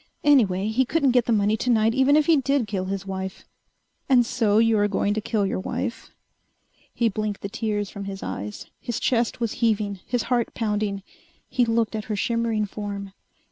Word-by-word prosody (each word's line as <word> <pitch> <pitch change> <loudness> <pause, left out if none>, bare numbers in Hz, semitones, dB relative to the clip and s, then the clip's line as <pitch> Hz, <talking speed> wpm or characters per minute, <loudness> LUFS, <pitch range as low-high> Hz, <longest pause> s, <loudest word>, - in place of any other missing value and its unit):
Anyway, 210 -10 +4
he 240 +4 +2
couldn't 275 +1 +2
get 245 -1 +3
the - - 0
money 210 -1 +3
tonight 225 -1 +2
even 265 +3 +4
if 305 - +3
he 330 - +5
did 275 -2 +1
kill 195 -3 -3
his 195 0 -4
wife. 190 -1 -5 0.6
"And 250 -3 +5
so 225 -4 +1
you 225 0 +4
are 205 - +3
going 205 0 0
to 215 - -2
kill 210 -2 0
your 190 - -1
wife...." 235 +5 -4 0.8
He 235 - +1
blinked 215 -1 -2
the 200 - -4
tears 210 -2 -2
from 200 -1 -7
his 195 -1 -6
eyes. 105 +2 -5
His 240 -3 -4
chest 235 -2 0
was 230 -2 -1
heaving, 210 -3 +1
his 245 -2 0
heart 240 -1 -1
pounding. 210 -3 -1 0.4
He 245 - +1
looked 230 -1 0
at 215 -1 -4
her 215 - -2
shimmering 230 0 0
form. 200 -1 -6
220 Hz, 190 wpm, -24 LUFS, 200-240 Hz, 0.8 s, he